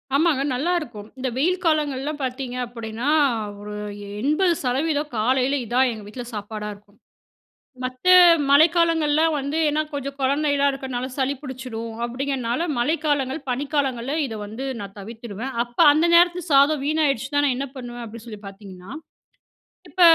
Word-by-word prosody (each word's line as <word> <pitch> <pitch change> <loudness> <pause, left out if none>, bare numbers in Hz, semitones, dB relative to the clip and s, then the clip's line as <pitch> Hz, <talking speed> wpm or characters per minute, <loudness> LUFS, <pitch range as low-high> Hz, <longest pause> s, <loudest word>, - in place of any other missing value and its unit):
ஆமாங்க. 295 -2 +3
நல்லாருக்கும். 275 -7 -2
இந்த 260 0 -2
வெயில் 355 +7 +1
காலங்கள்லாம் 295 -2 0
பார்த்தீங்க 255 -1 -4
அப்படீன்னா, 230 +2 -4 0.5
ஒரு 210 0 -7 0.5
80% 300 -1 +1
காலையில 255 +5 +2
இதான் 250 +3 +2
எங்க 220 -2 -8
வீட்ல 245 +4 -7
சாப்பாடா 210 0 -5
இருக்கும். 205 0 -23 0.9
மத்த 255 +6 -3 0.4
மழைக்காலங்கள்ல 315 0 +4 0.2
வந்து 285 +2 -2
"ஏன்னா 300 +1 +1
கொஞ்சம் 280 -1 -5
கொழந்தையல்லாம் 280 +1 +2
இருக்கறனால 260 -2 -4
சளி 270 +1 +1
புடிச்சிடும். 250 -4 -6
அப்படீங்கிறதுனால 255 +2 -2
மழைக்காலங்கள், 290 0 0
பனிக்காலங்கள்ல 270 -1 -1
இதை 225 -4 -6
வந்து 220 +6 -6 0.2
நான் 200 0 -8
தவிர்த்துடுவேன். 230 +3 -7
"அப்ப, 240 0 -12
அந்த 310 +3 +3
நேரத்தில 350 +1 +5
சாதம் 280 +1 +5
வீணாயிடுச்சுன்னா 285 -2 +1
நான் 275 -3 +2
என்ன 275 +2 -3
பண்ணுவேன்?" 240 -1 -7
அப்படீன்னு 230 +1 -11
சொல்லி 215 -3 -9
பார்த்தீங்கன்னா, 195 -1 -11 1.0
இப்ப 370 - -3
265 Hz, 130 wpm, -23 LUFS, 235-295 Hz, 1.0 s, நேரத்தில